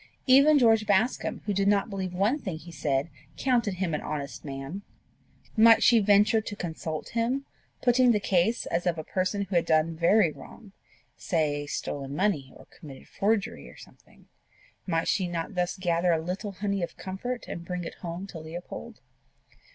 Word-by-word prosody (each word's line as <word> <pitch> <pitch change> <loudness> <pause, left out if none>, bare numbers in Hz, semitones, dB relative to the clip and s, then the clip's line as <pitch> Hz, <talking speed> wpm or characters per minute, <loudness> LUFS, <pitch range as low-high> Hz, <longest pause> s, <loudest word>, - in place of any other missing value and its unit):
Even 280 +3 +6
George 225 -4 +4
Bascombe, 205 +5 +1
who 205 - 0
did 195 0 +1
not 200 -1 +3
believe 190 -2 -3
one 200 +11 +1
thing 185 - -5
he 170 +2 -12
said, 145 -2 -1 0.3
counted 240 -7 +1
him 180 -3 -2
an 150 - -1
honest 140 -2 -5
man! 140 +6 -6 0.7
Might 225 0 +7
she 235 -2 +6
venture 210 +2 +4
to 210 -1 -6
consult 160 -3 -5
him, 245 +4 -1 0.4
putting 250 0 +5
the 210 - +2
case 195 +4 +1
as 175 +2 -1
of 170 -1 +1
a 155 - -4
person 185 +4 -1
who 195 -1 -5
had 170 - +3
done 160 +1 +2
very 170 +2 +4
wrong 210 +6 -13 0.5
say 145 -4 -1
stolen 140 -1 -4
money 165 -8 0
or - - -15
committed 140 -4 -12
forgery 205 0 -1
or - - -15
something? - - -18 0.6
Might 165 -2 0
she 185 -3 +1
not 170 +2 -4
thus 180 +1 -1
gather 175 -1 +1
a 165 - +3
little 185 +5 -4
honey 200 0 -2
of 170 - -5
comfort 235 +7 -5
and 170 - -6
bring 180 0 -4
it 165 - -6
home 175 +2 -5
to 190 -4 -9
Leopold? 160 +3 -8
185 Hz, 175 wpm, -27 LUFS, 165-210 Hz, 0.7 s, Might